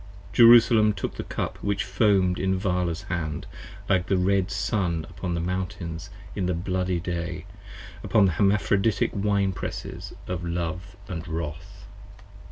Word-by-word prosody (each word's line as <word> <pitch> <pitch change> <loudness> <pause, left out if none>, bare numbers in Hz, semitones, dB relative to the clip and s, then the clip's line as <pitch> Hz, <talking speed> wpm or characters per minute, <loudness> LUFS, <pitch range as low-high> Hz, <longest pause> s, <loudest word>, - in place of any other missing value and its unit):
Jerusalem 115 -2 +7
took 95 - -4
the - - -5
Cup - - -4
which 100 0 0
foam'd 95 -2 +2
in 95 0 +1
Vala's 90 -3 -1
hand, 80 -4 -3 0.4
Like 90 -1 +2
the 95 - +2
red 95 +1 +2
Sun 95 -5 -1
upon 90 -2 -3
the - - -1
mountains 85 -2 -4 0.3
in 90 - -1
the 90 - 0
bloody 90 0 -1
day, 85 -1 -4 0.6
58 - - -9
Upon 105 - +4
the 95 - +3
Hermaphroditic 100 +3 +2
Wine 100 -1 +1
presses - - -6
of 90 -1 -3
Love 85 +3 -4
& 85 -2 -5
Wrath. 80 +3 -6
90 Hz, 145 wpm, -26 LUFS, 85-100 Hz, 0.6 s, Jerusalem